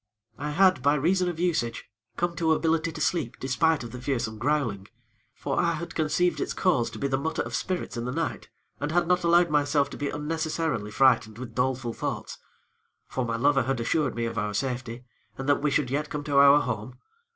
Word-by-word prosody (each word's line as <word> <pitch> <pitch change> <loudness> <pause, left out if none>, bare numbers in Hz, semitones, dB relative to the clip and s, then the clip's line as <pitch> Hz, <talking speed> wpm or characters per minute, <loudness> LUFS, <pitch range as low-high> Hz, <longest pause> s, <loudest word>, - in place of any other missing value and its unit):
"I 150 - -3
had, 180 -2 +4
by 145 +2 +3
reason 180 +5 +2
of 170 -2 -6
usage, 160 -10 -1 0.3
come 175 0 -1
to 165 -2 +3
ability 165 +1 +1
to 160 - -8
sleep 150 -6 -1
despite 150 +3 +1
of 120 - -8
the 125 - -8
fearsome 120 -5 -2
growling; 120 -7 -1 0.5
for - - -2
I 170 -1 +2
had 170 +1 -6
conceived 160 +3 +1
its - - -2
cause 160 -11 +2
to - - -9
be 140 - -1
the 135 -1 0
mutter 160 +3 -1
of - - -8
spirits 180 -9 -2
in 120 - -3
the 125 - -2
night, 165 +4 -3 0.3
and 145 +1 -2
had 175 +1 +2
not 180 0 +2
allowed 170 -1 +4
myself 145 -1 +2
to - - -7
be 145 - -2
unnecessarily 155 -6 -2
frightened 110 -2 +3
with 125 -1 -8
doleful 125 -2 -1
thoughts; - - -5 0.7
for 130 - -3
my 115 -1 -2
lover 135 +3 +3
had 130 +1 -1
assured 130 +4 0
me 120 0 -1
of 115 0 -3
our 105 0 -2
safety, 125 0 -3 0.3
and 135 - -5
that 145 -1 +3
we 150 - +2
should 140 -2 0
yet 150 +2 -1
come 150 -1 -4
to 145 -1 +2
our 140 +1 +7
home. 125 0 -4
145 Hz, 210 wpm, -27 LUFS, 125-160 Hz, 0.7 s, our